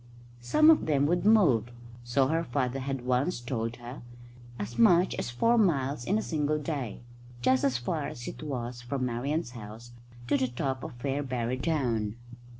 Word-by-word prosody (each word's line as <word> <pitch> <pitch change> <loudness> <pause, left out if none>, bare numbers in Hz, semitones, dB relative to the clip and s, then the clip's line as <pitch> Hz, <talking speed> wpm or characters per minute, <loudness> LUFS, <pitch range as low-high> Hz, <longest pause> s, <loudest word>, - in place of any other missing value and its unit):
Some 305 - +5
of 315 - +2
them 145 -2 +3
would 175 +5 +1
move, 175 - +5 0.4
so 120 +3 +2
her 165 +5 +1
father 130 -1 -1
had 135 -2 -4
once 130 +5 +1
told 120 -1 -3
her, 120 +2 -9 0.6
as 115 +3 -5
much 175 +10 +5
as - - -3
four 230 - +2
miles 140 - +1
in 205 - +2
a 220 - -1
single 150 -1 0
day, 140 -8 -4 0.4
just 130 +1 +3
as 130 -3 +2
far 145 +5 -2
as 120 - -8
it - - -7
was 125 -5 -4
from 130 +2 -2
Marian's 125 +5 -2
house 115 0 -10 0.3
to 140 - +2
the 130 -1 +1
top 130 +2 -3
of - - -7
Fairbarrow 130 -2 -2
Down. 115 -10 0
130 Hz, 170 wpm, -29 LUFS, 120-150 Hz, 0.6 s, Some